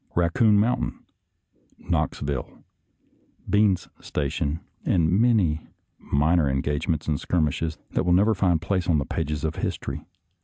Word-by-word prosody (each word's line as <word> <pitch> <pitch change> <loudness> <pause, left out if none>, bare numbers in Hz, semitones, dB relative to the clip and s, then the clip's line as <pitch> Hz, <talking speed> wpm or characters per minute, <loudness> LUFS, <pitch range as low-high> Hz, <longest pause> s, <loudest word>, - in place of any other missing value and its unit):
Raccoon 105 +5 +3
Mountain,. 115 +4 +1 0.8
Knoxville, 70 -3 -3 0.8
Bean's 105 -3 +2
Station, 75 +2 -2 0.2
and 85 -2 +2
many 95 -7 +2 0.3
minor 75 +1 +2
engagements 75 +5 -1
and 75 -2 0
skirmishes 80 -1 -1
that - - 0
will 90 - +1
never 105 +5 +4
find 90 -4 +2
place 90 +2 -1
on 80 - +4
the 70 - 0
pages 75 -2 -3
of 80 0 -2
history. - - -3
85 Hz, 120 wpm, -25 LUFS, 75-95 Hz, 0.8 s, never